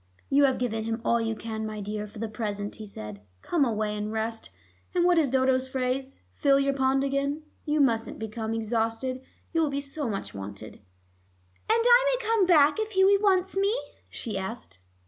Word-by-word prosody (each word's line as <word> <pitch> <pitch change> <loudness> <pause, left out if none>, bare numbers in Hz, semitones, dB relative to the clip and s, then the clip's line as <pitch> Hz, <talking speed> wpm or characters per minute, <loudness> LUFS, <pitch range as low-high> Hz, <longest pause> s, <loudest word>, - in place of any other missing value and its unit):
"You 280 +1 +5
have 265 -2 +2
given 225 -3 -2
him 225 +1 -2
all 235 0 +3
you 225 0 -1
can, 220 0 -5
my 215 -1 -4
dear, 210 +1 -4
for 210 +2 -13
the 225 +1 -3
present," 205 -2 -4
he 215 -1 -8
said. 105 - -8 0.2
"Come 335 -5 +2
away 215 -4 0
and 210 0 -3
rest, 225 +1 -3 0.5
and 350 -1 +3
what 355 -1 +5
is 295 -4 +2
Dodo's 260 0 +2
phrase? 260 +1 -2
fill 275 - +3
your 275 0 +2
pond 270 0 +2
again. 280 +2 -1 0.2
You 300 0 +1
mustn't 230 -4 +1
become 220 0 -4
exhausted; 225 +3 -1 0.3
you 330 - +2
will 310 - +2
be 280 0 -2
so 280 -1 -4
much 200 -2 -4
wanted." 100 +2 -8
"And - - -28 1.0
I - - +5
may - - -6
come 445 -5 +3
back 310 +1 +5
if 435 0 -2
Hughie 390 +1 +5
wants 385 -2 +2
me?" 400 +4 +2 0.3
she 215 -5 -4
asked. 190 - -7
255 Hz, 190 wpm, -27 LUFS, 220-295 Hz, 1.0 s, You